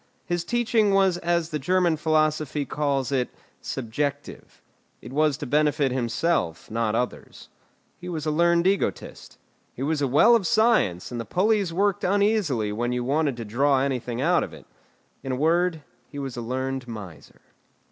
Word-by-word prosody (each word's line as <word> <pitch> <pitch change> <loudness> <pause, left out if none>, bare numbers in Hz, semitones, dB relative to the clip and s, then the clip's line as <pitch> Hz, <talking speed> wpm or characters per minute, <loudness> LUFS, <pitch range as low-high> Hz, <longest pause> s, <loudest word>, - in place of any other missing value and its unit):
His 175 -1 -2
teaching 225 -1 +1
was 190 -2 +3
as 170 -1 0
the 150 - -2
German 175 +3 +2
philosophy 155 -2 0
calls 140 -1 -1
it, 130 -3 0 0.3
'subjective'; 140 +4 -4 0.4
it 125 - -11
was 150 -1 +2
to - - -6
benefit 145 -1 +1
himself, 125 - -1
not 115 -1 0
others. 125 +1 -4 0.5
He 180 - -7
was 160 -3 -4
a 155 - 0
learned 170 +2 +3
egotist. 195 +1 -2 0.4
He 130 - -5
was 150 +1 0
a 140 - +2
well 150 - +5
of 205 -6 +1
science, 215 - +2
and 120 -1 -3
the - - -4
pulleys 195 - +1
worked 195 +2 0
uneasily 195 - +1
when 120 +3 -2
you 125 0 -1
wanted 140 0 0
to 115 - -6
draw 135 +6 +2
anything 125 -3 -2
out 170 +5 +3
of - - -7
it. - - -15 0.6
In 135 - -4
a - - 0
word, 165 +2 +1 0.3
he 145 - -10
was 135 -3 -5
a 120 - -4
learned 130 +2 -3
miser. 95 -10 -10
150 Hz, 165 wpm, -25 LUFS, 125-175 Hz, 0.6 s, well